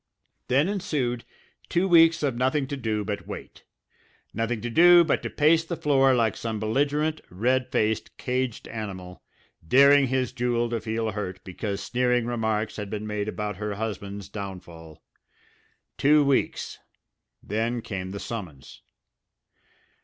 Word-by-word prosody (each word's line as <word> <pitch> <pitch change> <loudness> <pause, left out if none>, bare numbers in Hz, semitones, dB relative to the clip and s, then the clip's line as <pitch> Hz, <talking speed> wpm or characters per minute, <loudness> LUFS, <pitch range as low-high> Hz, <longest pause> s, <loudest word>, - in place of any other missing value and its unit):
Then 135 +6 +3
ensued 140 - -2 0.4
two 180 +3 +1
weeks 165 -2 +5
of 135 -4 0
nothing 130 +3 +1
to 145 - -2
do 110 -5 -2
but 105 0 -4
wait. - - -9 0.7
Nothing 115 +1 -1
to 120 - -3
do 175 +5 +7
but 160 - 0
to - - -4
pace 160 +2 +3
the 170 +1 -4
floor 135 -3 +3
like 115 -4 +1
some 110 -2 -4
belligerent, 145 +8 0
red 125 +7 0
faced 110 0 -1
caged 125 -2 -2
animal, 95 -5 -7 0.5
daring 140 - +6
his 130 -1 0
Jewel 120 -1 -1
to 115 -2 -1
feel 110 0 -2
hurt 95 -3 -5
because 100 +1 -4
sneering 125 -1 +1
remarks 110 -2 -1
had 105 -2 -5
been 105 0 -4
made 105 -1 -3
about 105 -2 -4
her 105 0 -3
husband's 100 -2 -5
downfall. 85 -6 -9 1.0
Two 145 +1 +5
weeks 140 -1 0 0.6
then 115 +3 -2
came 95 -2 -5
the 100 +1 -6
summons. 90 - -8
115 Hz, 140 wpm, -26 LUFS, 105-135 Hz, 1.0 s, do